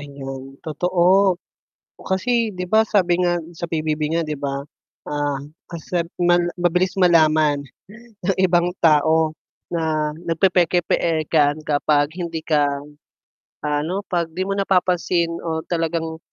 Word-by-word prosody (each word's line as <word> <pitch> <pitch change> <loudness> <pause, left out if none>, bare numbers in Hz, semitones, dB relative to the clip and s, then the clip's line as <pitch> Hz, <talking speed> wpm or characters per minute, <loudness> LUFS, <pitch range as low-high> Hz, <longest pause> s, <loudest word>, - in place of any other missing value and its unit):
Ayun, 135 -1 -8
totoo, 180 +4 +3 0.6
oh, - - -14
kasi, 230 +5 +1
'di 180 0 -4
ba, 220 +3 +5
sabi 180 -4 +2
nga 175 -1 +2 0.2
sa 170 - -4
PBB 155 -1 -2
nga, 170 - +1
'di 155 -1 -4
ba, 140 0 -3 0.4
ah, 145 -1 -1 0.3
kasi 170 +1 -3 0.2
mal 175 0 +4 0.2
mabilis 180 +2 +1
malaman 155 -5 +4 0.7
ng 195 - +1
ibang 175 -2 +3
tao 160 0 +4 0.4
na 155 -2 -1
nagpepeke-pekean 165 -3 +1
kapag 145 0 +1
hindi 170 -2 -3
ka, 150 -2 +3 1.0
ano, 150 +6 -1
'pag 170 -2 -1
'di 185 - -1
mo 200 - -2
napapansin 180 -3 +1
o 160 -1 -2
talagang 165 -1 -2
165 Hz, 120 wpm, -21 LUFS, 155-180 Hz, 1.0 s, ba